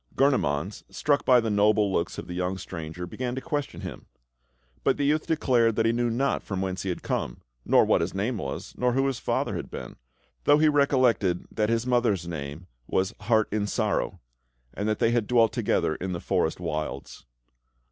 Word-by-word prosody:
Gurnemanz, 100 Hz, -, +1 dB
struck 145 Hz, -1 st, 0 dB
by 125 Hz, -1 st, +6 dB
the 110 Hz, -2 st, -1 dB
noble 105 Hz, -1 st, +3 dB
looks 85 Hz, -1 st, -1 dB
of -, -, -5 dB
the 90 Hz, -, -7 dB
young 90 Hz, +1 st, -2 dB
stranger, 80 Hz, 0 st, -6 dB
began 125 Hz, +6 st, -4 dB
to -, -, -2 dB
question 145 Hz, 0 st, -3 dB
him; -, -, -8 dB, 0.8 s
but -, -, +2 dB
the 145 Hz, -, 0 dB
youth 155 Hz, +2 st, +1 dB
declared 120 Hz, -8 st, +2 dB
that 115 Hz, -, +2 dB
he 115 Hz, -, +4 dB
knew 120 Hz, 0 st, 0 dB
not 135 Hz, +4 st, 0 dB
from 95 Hz, -2 st, -4 dB
whence 95 Hz, -1 st, -2 dB
he 95 Hz, -, -3 dB
had 90 Hz, -, -4 dB
come, -, -, -3 dB, 0.2 s
nor -, -, +5 dB
what -, -, +3 dB
his 85 Hz, +3 st, -2 dB
name 105 Hz, +3 st, -1 dB
was, 70 Hz, -6 st, -5 dB
nor 125 Hz, -1 st, +1 dB
who 135 Hz, +2 st, +2 dB
his 135 Hz, -3 st, -1 dB
father -, -, -1 dB
had -, -, -5 dB
been, -, -, -8 dB, 0.5 s
though 145 Hz, -, +6 dB
he 155 Hz, +1 st, +4 dB
recollected 130 Hz, -11 st, +2 dB
that 105 Hz, -1 st, 0 dB
his 115 Hz, +1 st, +1 dB
mother's 115 Hz, -8 st, +1 dB
name 75 Hz, 0 st, -6 dB, 0.2 s
was 95 Hz, 0 st, 0 dB
"Heart 110 Hz, 0 st, +2 dB
in 105 Hz, 0 st, 0 dB
Sorrow," -, -, -1 dB, 0.5 s
and 105 Hz, +2 st, -2 dB
that 110 Hz, -, 0 dB
they 115 Hz, -, +2 dB
had 120 Hz, -3 st, +1 dB
dwelt 115 Hz, -3 st, +4 dB
together -, -, +1 dB
in 90 Hz, +3 st, -4 dB
the 85 Hz, -, -3 dB
forest 80 Hz, 0 st, 0 dB
wilds. 75 Hz, -7 st, -5 dB
110 Hz, 200 wpm, -26 LUFS, 90-125 Hz, 0.8 s, by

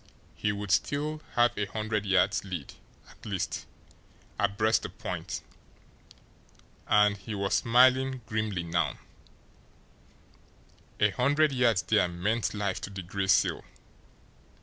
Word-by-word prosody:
He 105 Hz, -, -1 dB
would 100 Hz, -1 st, -4 dB
still 150 Hz, +7 st, 0 dB
have 120 Hz, 0 st, +3 dB
a 105 Hz, -1 st, -2 dB
hundred 105 Hz, 0 st, -2 dB
yards' 95 Hz, +1 st, +2 dB
lead, 90 Hz, -8 st, -6 dB, 0.3 s
at -, -, -19 dB
least, 100 Hz, -4 st, -3 dB, 0.7 s
abreast 110 Hz, +2 st, +2 dB
the -, -, -5 dB
point -, -, -5 dB, 1.4 s
and, 105 Hz, 0 st, +4 dB
he 105 Hz, +2 st, -6 dB
was 100 Hz, -1 st, -1 dB
smiling 130 Hz, +2 st, +4 dB
grimly 110 Hz, -5 st, -2 dB
now, 85 Hz, -3 st, -1 dB, 2.0 s
a 105 Hz, 0 st, +4 dB
hundred 145 Hz, +8 st, +2 dB
yards 120 Hz, -8 st, +2 dB
there 90 Hz, -, +3 dB
meant 100 Hz, +7 st, -1 dB
life 100 Hz, -2 st, -2 dB
to -, -, -5 dB
the 95 Hz, -2 st, -7 dB
Gray 95 Hz, +2 st, -3 dB
Seal! 95 Hz, -, +3 dB
105 Hz, 120 wpm, -28 LUFS, 95-115 Hz, 2.0 s, and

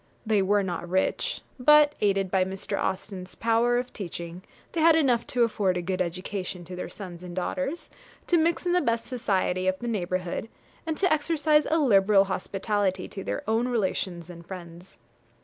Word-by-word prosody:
They 215 Hz, -2 st, +3 dB
were 200 Hz, +1 st, +2 dB
not 175 Hz, -2 st, -4 dB
rich, 190 Hz, +1 st, 0 dB, 0.2 s
but, 300 Hz, +2 st, +6 dB
aided 195 Hz, -2 st, +1 dB
by 190 Hz, -1 st, +3 dB
Mr. 190 Hz, +2 st, -3 dB
Austen's 185 Hz, -1 st, -4 dB
powers 235 Hz, +2 st, +2 dB
of 250 Hz, -, -26 dB
teaching, 170 Hz, -2 st, -6 dB, 0.3 s
they 330 Hz, -, -1 dB
had 325 Hz, 0 st, +6 dB
enough 255 Hz, -7 st, +2 dB
to 245 Hz, -1 st, +2 dB
afford 200 Hz, -5 st, +1 dB
a -, -, -1 dB
good 185 Hz, +1 st, -1 dB
education 185 Hz, 0 st, -4 dB
to 180 Hz, +2 st, -8 dB
their 180 Hz, -, -5 dB
sons 180 Hz, -4 st, -9 dB
and 180 Hz, -1 st, -8 dB
daughters, 275 Hz, -, -3 dB, 0.3 s
to 345 Hz, -, +3 dB
mix 335 Hz, +2 st, +1 dB
in 350 Hz, -, +1 dB
the 360 Hz, -, +3 dB
best 230 Hz, -3 st, 0 dB
society 190 Hz, -6 st, 0 dB
of 185 Hz, 0 st, +1 dB
the 240 Hz, -, -6 dB
neighbourhood, 185 Hz, -1 st, -2 dB, 0.4 s
and 320 Hz, -1 st, -1 dB
to 370 Hz, -4 st, +3 dB
exercise 305 Hz, 0 st, +2 dB
a 320 Hz, -, +2 dB
liberal 200 Hz, -8 st, +5 dB
hospitality 195 Hz, -1 st, -1 dB
to 195 Hz, -, -7 dB
their -, -, -4 dB
own 225 Hz, +3 st, +1 dB
relations 185 Hz, -7 st, -2 dB
and 170 Hz, -1 st, -11 dB
friends. 175 Hz, -6 st, -10 dB
200 Hz, 180 wpm, -27 LUFS, 185-245 Hz, 0.4 s, but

